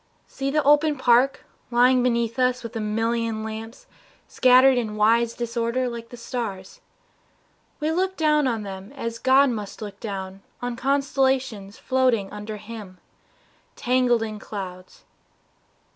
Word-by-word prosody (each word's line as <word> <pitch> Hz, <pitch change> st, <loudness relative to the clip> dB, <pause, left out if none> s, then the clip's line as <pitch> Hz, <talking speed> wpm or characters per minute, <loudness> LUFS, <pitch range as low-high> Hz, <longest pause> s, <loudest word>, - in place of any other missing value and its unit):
See 270 Hz, 0 st, -4 dB
the 300 Hz, +1 st, +1 dB
open 295 Hz, +1 st, +4 dB
park 255 Hz, +1 st, +3 dB, 0.2 s
Lying 250 Hz, +1 st, +4 dB
below 235 Hz, -1 st, +2 dB, 0.2 s
us 250 Hz, -1 st, -7 dB
with 230 Hz, -1 st, -8 dB
a -, -, -2 dB
million 225 Hz, +1 st, -1 dB
lamps 220 Hz, +2 st, -7 dB, 0.4 s
Scattered 255 Hz, +1 st, +5 dB
in 220 Hz, -4 st, -2 dB
wise 230 Hz, +2 st, +3 dB
disorder 235 Hz, +1 st, -1 dB
like 235 Hz, -1 st, -7 dB
the 245 Hz, -, -10 dB
stars. 225 Hz, -6 st, -6 dB, 1.0 s
We 305 Hz, +1 st, 0 dB
look 375 Hz, +3 st, -1 dB
down 300 Hz, -3 st, +3 dB
on 225 Hz, -4 st, -1 dB
them 195 Hz, +1 st, -8 dB
as 230 Hz, -4 st, -5 dB
God 265 Hz, +1 st, +4 dB
must 210 Hz, -4 st, -6 dB
look 205 Hz, -2 st, -8 dB
down 195 Hz, -2 st, -6 dB, 0.2 s
On 245 Hz, -1 st, -4 dB
constellations 265 Hz, -5 st, 0 dB
floating 255 Hz, -6 st, +1 dB
under 210 Hz, +1 st, -6 dB
Him 210 Hz, -3 st, -10 dB, 0.8 s
Tangled 245 Hz, -2 st, +2 dB
in 215 Hz, -1 st, -5 dB
clouds. 185 Hz, -4 st, -8 dB
235 Hz, 135 wpm, -24 LUFS, 215-260 Hz, 1.0 s, Scattered